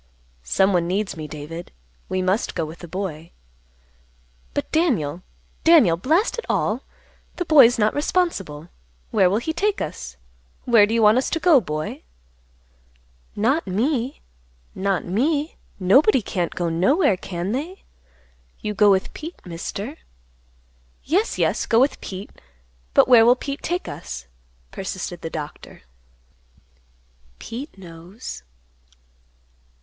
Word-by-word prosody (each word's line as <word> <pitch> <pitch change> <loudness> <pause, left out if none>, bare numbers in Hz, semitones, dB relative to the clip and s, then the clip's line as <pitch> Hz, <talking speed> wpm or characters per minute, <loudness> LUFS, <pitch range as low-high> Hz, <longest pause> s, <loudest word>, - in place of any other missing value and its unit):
"Someone 175 - +2
needs 195 +3 -1
me, 155 -2 -6
David. 155 +3 -8 0.4
We 185 0 -1
must 190 +4 0
go 165 -3 -1
with 160 +2 -10
the 175 - -9
boy." 170 -3 -5 1.3
"But, - - -3
Daniel, 205 - +1 0.4
Daniel! 315 - +6
Blast 325 - +1
it - - -6
all! 225 +5 0 0.5
The 355 - -3
boy's 270 -7 +7
not 215 -1 +2
responsible. 200 - -1 0.4
Where 185 - +4
will 200 - +1
he 315 +8 -2
take 405 +5 0
us? 65 +1 -6 0.5
Where 225 -4 +6
do 225 - -1
you 230 - +3
want 215 +4 +6
us 260 - -1
to 325 - -1
go, 320 -6 +5
boy?" 155 -4 -4 1.3
"Not 265 +10 +1
me; 245 +6 -1 0.5
not 195 -1 -1
me; 285 - 0 0.2
nobody 250 - +4
can't 175 -3 -2
go 175 - -1
nowhere, 195 - +3
can 180 +1 -4
they? 315 - -4 0.8
You 210 - -3
go 205 0 +5
with 190 -1 +2
Pete, 325 +3 -8
Mister." 195 - -6 1.1
"Yes, 385 - 0
yes; - - 0
go 230 - +4
with 270 +3 +2
Pete; 190 +2 -7 0.6
but - - +6
where 240 -3 +7
will 240 +2 +6
Pete 275 +2 -5
take 355 +2 -2
us?" 60 0 -7 0.5
persisted 185 -2 -5
the 165 - -4
Doctor. 150 - -8 1.5
"Pete 250 - -8
knows." 180 +5 -9
205 Hz, 130 wpm, -22 LUFS, 175-285 Hz, 1.5 s, boy's